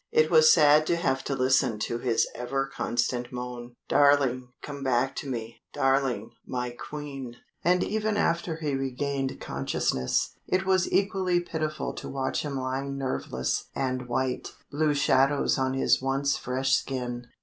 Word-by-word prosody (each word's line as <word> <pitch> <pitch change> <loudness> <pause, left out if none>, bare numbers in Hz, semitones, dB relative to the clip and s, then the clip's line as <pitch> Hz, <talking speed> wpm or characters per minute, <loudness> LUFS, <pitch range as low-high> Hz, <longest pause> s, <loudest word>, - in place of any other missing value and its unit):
It 465 0 +3
was 470 0 +7
sad 150 - +6
to 170 - +2
have 135 -5 0
to 140 - -1
listen 130 -3 +2
to 120 +2 -2
his 120 -2 +2
ever 135 +3 -2
constant 120 -1 -2
moan: 125 -1 -6
"Darling, 135 -3 +3
come 145 -1 -7
back 130 0 +1
to 140 - -4
me 115 -2 -5
darling, 135 -4 +1
my 125 -1 -3
Queen." 135 -1 -7 0.3
And 180 +2 +3
even 215 -1 -1
after 170 -3 0
he 155 -3 -3
regained 135 0 -2
consciousness, 65 -1 -1 0.2
it 185 +1 +1
was 190 -1 +2
equally 190 -2 +2
pitiful 155 -3 -3
to - - -7
watch 135 -1 -1
him 145 -2 -4
lying 135 +2 -3
nerveless 70 - -2
and 130 -1 -2
white, 125 +1 -2 0.2
blue 150 0 +1
shadows 140 0 +3
on 130 0 0
his 135 - +3
once 135 +1 +1
fresh 130 +1 -1
skin. 125 -2 -4
135 Hz, 150 wpm, -27 LUFS, 125-145 Hz, 0.3 s, was